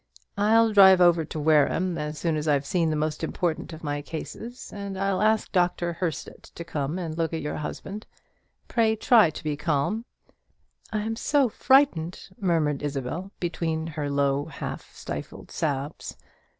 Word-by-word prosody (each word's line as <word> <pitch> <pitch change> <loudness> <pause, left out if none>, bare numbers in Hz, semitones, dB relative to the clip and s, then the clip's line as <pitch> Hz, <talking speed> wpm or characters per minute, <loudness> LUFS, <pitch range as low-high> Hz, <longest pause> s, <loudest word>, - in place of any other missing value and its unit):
I'll 225 +2 +4
drive 190 -2 +8
over 175 -2 +5
to 155 - -6
Wareham, 160 +4 +3
as 150 -1 -4
soon 165 -1 0
as 155 0 -2
I've 145 -2 +2
seen 170 -1 +1
the 155 - 0
most 155 +1 -2
important 165 +1 -2
of 160 0 -10
my 145 -1 -2
cases; 225 - -8
and 200 -1 -5
I'll 195 0 0
ask 220 0 +2
Dr. 175 -2 +1
Herstett 170 -2 -4
to 170 - -6
come 150 -1 -3
and 165 -4 -4
look 165 0 -1
at 160 - -3
your 150 - -3
husband. 195 +7 -6 0.6
Pray 225 -2 +2
try 220 -4 +5
to 155 - -9
be 150 -1 -1
calm." 160 +9 -1 0.9
"I 215 - -1
am 225 +1 -2
so 275 +2 +2
frightened," 230 - +2
murmured 160 -7 +1
Isabel, 145 +6 -4
between 165 -2 -2
her 150 -3 -4
low 140 0 +1
half - - -7
stifled - - -7
sobs. 145 -2 -3
165 Hz, 165 wpm, -26 LUFS, 150-195 Hz, 0.9 s, drive